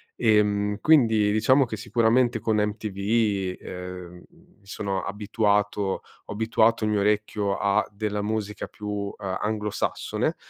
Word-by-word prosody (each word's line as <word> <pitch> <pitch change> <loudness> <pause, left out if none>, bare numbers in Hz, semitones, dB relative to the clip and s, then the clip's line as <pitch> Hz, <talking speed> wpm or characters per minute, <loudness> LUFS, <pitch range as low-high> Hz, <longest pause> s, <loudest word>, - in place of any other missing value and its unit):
Ehm, 105 -2 +2
quindi 110 -9 +4
diciamo 130 +5 +4
che 115 - -5
sicuramente 115 +1 +2
con 110 0 0
MTV, 105 -2 0
uhm, 90 -1 -8 0.4
mi 100 - -28
sono 100 -2 -3
abituato 105 0 0 0.4
ho - - -10
abituato 110 +1 +2
il 105 - 0
mio 105 -1 +1
orecchio 105 -1 0
a 100 0 +2
della 105 0 -3
musica 105 -1 -3
più, 105 - -10
uhm, 100 -1 -3
anglosassone; 105 +2 -2
105 Hz, 125 wpm, -25 LUFS, 100-110 Hz, 0.4 s, quindi